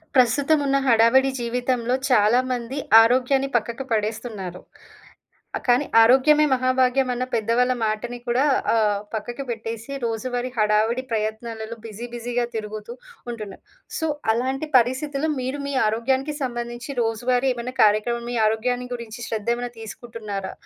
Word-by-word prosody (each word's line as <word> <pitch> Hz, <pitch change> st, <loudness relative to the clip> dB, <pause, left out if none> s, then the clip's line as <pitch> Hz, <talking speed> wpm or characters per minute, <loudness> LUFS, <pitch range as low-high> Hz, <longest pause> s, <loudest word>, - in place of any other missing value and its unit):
ప్రస్తుతం 275 Hz, +5 st, +4 dB
ఉన్న 275 Hz, 0 st, +2 dB
హడావిడి 250 Hz, +3 st, +5 dB
జీవితంలో 245 Hz, 0 st, -1 dB
చాలా 225 Hz, 0 st, +4 dB
మంది 250 Hz, +2 st, -3 dB, 0.3 s
ఆరోగ్యాన్ని 260 Hz, +3 st, +2 dB
పక్కకు 235 Hz, +3 st, -4 dB
పడేస్తున్నారు. 210 Hz, -4 st, -3 dB, 1.1 s
కానీ 250 Hz, +3 st, +3 dB, 0.2 s
ఆరోగ్యమే 270 Hz, +6 st, +5 dB
మహాభాగ్యం 255 Hz, 0 st, +2 dB
అన్న 250 Hz, +1 st, -2 dB
పెద్దవాళ్ళ 235 Hz, +3 st, +2 dB
మాటని 225 Hz, +3 st, -3 dB
కూడా 245 Hz, +3 st, +2 dB, 0.3 s
ఆహ్, 210 Hz, -3 st, +2 dB
పక్కకు 240 Hz, +5 st, -4 dB
పెట్టేసి. 225 Hz, +1 st, -5 dB
రోజువారీ 245 Hz, +2 st, -2 dB
హడావిడి 215 Hz, +3 st, +2 dB
ప్రయత్నాలలో 220 Hz, +1 st, -3 dB
బిజీ 225 Hz, +2 st, -7 dB
బిజీ‌గా 240 Hz, +1 st, -2 dB
తిరుగుతూ 215 Hz, +1 st, -5 dB, 0.4 s
ఉంటున్నారు. 215 Hz, -4 st, -8 dB, 0.4 s
సో, 320 Hz, -, -1 dB, 0.2 s
అలాంటి 265 Hz, +6 st, -2 dB
పరిస్థితుల్లో 275 Hz, +5 st, -1 dB
మీరు 260 Hz, +3 st, -3 dB
మీ 280 Hz, -, -3 dB
ఆరోగ్యానికి 260 Hz, +7 st, 0 dB
సంబంధించి 240 Hz, 0 st, -4 dB
రోజువారీ 245 Hz, +3 st, 0 dB
ఏమైనా 245 Hz, +1 st, -6 dB
కార్యక్రమం, 215 Hz, +3 st, +1 dB
మీ -, -, -2 dB
ఆరోగ్యాన్ని 245 Hz, +3 st, -1 dB
గురించి 235 Hz, 0 st, -8 dB
శ్రద్ధ 220 Hz, 0 st, -2 dB
ఏమైనా 245 Hz, 0 st, -5 dB
తీసుకుంటున్నారా? 215 Hz, -3 st, -6 dB
240 Hz, 120 wpm, -23 LUFS, 225-255 Hz, 1.1 s, హడావిడి